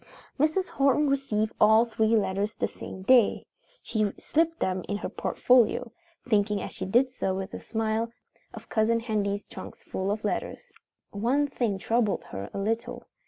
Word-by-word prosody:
Mrs. 315 +6 +2
Horton 280 -1 +2
received 220 -6 0
all 220 +2 +6
three 225 -1 +1
letters 200 +1 -1
the - - -1
same 190 - -9
day. 240 0 +4 0.4
She 215 -3 0
slipped 330 +1 0
them 185 0 0
away 185 - -6
in 205 - -1
her - - -4
portfolio, 245 -1 +2 0.4
thinking 210 -2 +2
as - - -5
she - - -5
did 250 +6 +3
so, 190 -7 -2
with 195 +1 -5
a - - -5
smile, 225 0 -1 0.4
of - - -11
Cousin 225 +1 +2
Hendy's 205 -3 -1
trunks 190 - -10
full 190 +1 -3
of 210 +1 -2
letters. 210 - -3 0.4
One 245 +8 +1
thing 240 -8 -1
troubled 225 +1 0
her 100 +1 -5
a - - -6
little. 225 +3 -2
220 Hz, 165 wpm, -27 LUFS, 205-250 Hz, 0.4 s, all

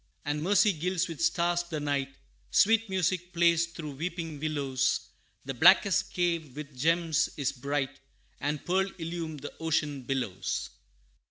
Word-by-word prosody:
And 145 +1 -1
mercy 205 +4 +4
gilds 180 +2 -1
with 165 -3 -7
stars 175 +1 +2
the 170 -3 -5
night; 140 -2 -1 0.4
Sweet 225 +1 +4
music 180 -1 -1
plays 170 -1 +4
through 155 -5 -8
weeping 165 -2 -4
willows; 140 -4 0 0.4
The 135 - -3
blackest 190 - +5
cave 170 -6 -1
with 150 -2 -8
gems 165 +3 +2
is 140 -4 0
bright, 135 0 -3 0.4
And 145 +1 -2
pearls 190 +2 +1
illume 165 -2 -4
the - - -8
ocean 150 -3 0
billows. 125 -7 -3
160 Hz, 140 wpm, -29 LUFS, 145-175 Hz, 0.4 s, blackest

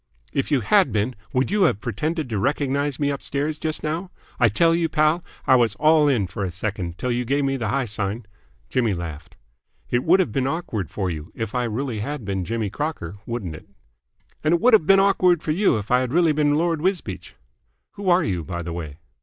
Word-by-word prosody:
"If 135 - -1
you 140 -4 +2
had 195 - +3
been, 110 +4 0 0.2
would 130 +6 0
you 210 0 +1
have 105 - +1
pretended 150 - -2
to 110 -3 -1
recognise 140 +2 0
me 145 -1 +1
upstairs 145 +2 -3
just 155 -1 -3
now? 165 +4 -3 0.3
I 120 -3 +5
tell 165 - +3
you, 165 -1 +1
pal, 155 +2 +2 0.2
I 130 - +6
was 115 -4 +2
all 155 +4 +4
in 125 -8 +2
for 95 +3 -5
a 95 - -1
second, 90 -2 -4
till 125 - -2
you 120 +1 0
gave 140 +3 0
me 135 0 0
the 120 -5 -2
high 130 +5 0
sign." 105 0 -3 0.4
Jimmy 120 -6 +1
laughed. 80 -3 -7 0.6
"It 120 +1 +1
would 180 +4 +5
have 180 - +1
been 130 +3 0
awkward 135 - -3
for 95 -3 -2
you 80 +3 -7
if 110 -1 -4
I 125 -1 0
really 115 0 -3
had 135 +2 -4
been 95 -2 -2
Jimmy 110 -2 -2
Crocker, 105 - -4
wouldn't 105 -9 -4
it?" - - -13 0.8
"And 155 +2 +3
it - - 0
would 245 +4 +4
have 190 -8 +5
been 195 0 +7
awkward 185 -4 +3
for 155 - -1
you 185 - +2
if 105 +2 -6
I 125 - +5
had 130 0 -2
really 170 -1 +4
been 145 -1 +2
Lord 165 0 +1
Wisbeach." 175 - -2 0.6
"Who 200 -2 -3
are 175 0 +5
you, 90 -5 -2
by 85 0 -5
the 85 0 -5
way?" 80 -4 -6
130 Hz, 220 wpm, -23 LUFS, 105-155 Hz, 0.8 s, been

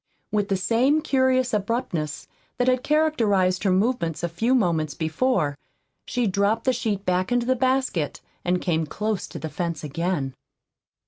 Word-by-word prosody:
With 205 -1 +1
the 195 - +2
same 255 +10 +2
curious 260 -4 +2
abruptness 200 - -2 0.3
that 245 - +1
had 255 -1 +3
characterized 220 -13 +2
her 195 - +2
movements 185 -5 0
a 170 - 0
few 225 +10 +1
moments 160 - +1
before, 160 - 0 0.5
she 245 -1 0
dropped 205 +3 +1
the 260 - +2
sheet 215 -5 -2
back 185 +2 0
into 245 -1 +2
the 260 +1 +2
basket 255 - 0 0.2
and 180 +1 +1
came 160 -3 0
close 210 +4 -2
to - - -8
the 160 - -4
fence 170 -1 -3
again. 150 -2 -2
200 Hz, 155 wpm, -24 LUFS, 170-250 Hz, 0.5 s, had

